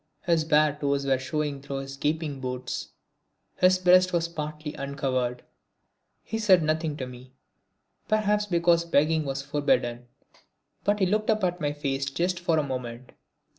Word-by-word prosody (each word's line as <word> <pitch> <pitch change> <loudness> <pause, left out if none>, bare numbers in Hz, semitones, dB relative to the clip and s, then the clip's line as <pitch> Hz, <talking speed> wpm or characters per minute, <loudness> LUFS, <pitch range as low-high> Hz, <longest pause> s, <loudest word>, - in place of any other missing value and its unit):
His 170 -3 +2
bare 150 -1 +3
toes 140 -1 0
were 135 -1 +2
showing 145 +1 -3
through 140 0 -4
his 135 0 -7
gaping 150 0 -2
boots, 125 -1 -4 0.7
his 185 0 +5
breast 185 0 +5
was 170 -1 +1
partly 155 -2 -5
uncovered. 130 -3 -2 0.8
He 225 - -4
said 190 -6 +5
nothing 155 -1 -1
to 130 - -4
me, 125 +1 -12 0.7
perhaps 210 -1 +1
because 170 -2 +3
begging 160 -1 +2
was 135 0 -3
forbidden, 125 -4 0 0.8
but 205 +1 +2
he - - +5
looked 215 +4 0
up 215 -2 +2
at 180 -1 0
my 145 -1 0
face 140 -2 -2
just 175 +5 -1
for 170 -2 +1
a 155 - +2
moment. 125 -2 -6
150 Hz, 155 wpm, -27 LUFS, 135-175 Hz, 0.8 s, his